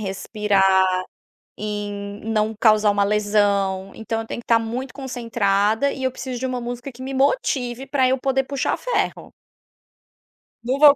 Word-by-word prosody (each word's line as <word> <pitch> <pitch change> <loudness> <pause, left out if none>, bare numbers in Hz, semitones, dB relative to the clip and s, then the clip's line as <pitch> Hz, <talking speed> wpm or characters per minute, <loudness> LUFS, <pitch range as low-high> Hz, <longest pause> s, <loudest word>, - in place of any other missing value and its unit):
respirar 195 -2 +2 0.6
e - - -7 0.2
em 200 0 -6
não 220 0 0
causar 215 -2 +5
uma 205 0 +2
lesão. 200 -2 +1
Então 225 0 -3
eu 225 - -9
tenho 235 - -5
que - - -27
estar 230 -1 +4
muito 240 +3 -4
concentrada 230 -2 0
e 265 - -6
eu 260 - +1
preciso 255 -1 -5
de 260 - -2
uma 255 -1 -2
música 245 +3 -5
que 255 +1 -10
me 270 - -5
motive 265 - 0
para 265 -2 +2
eu 260 - +2
poder 270 0 +1
puxar 275 0 -1
ferro. - - -2 1.3
Não 255 +3 0
vou 290 0 +8
230 Hz, 165 wpm, -22 LUFS, 205-260 Hz, 1.3 s, vou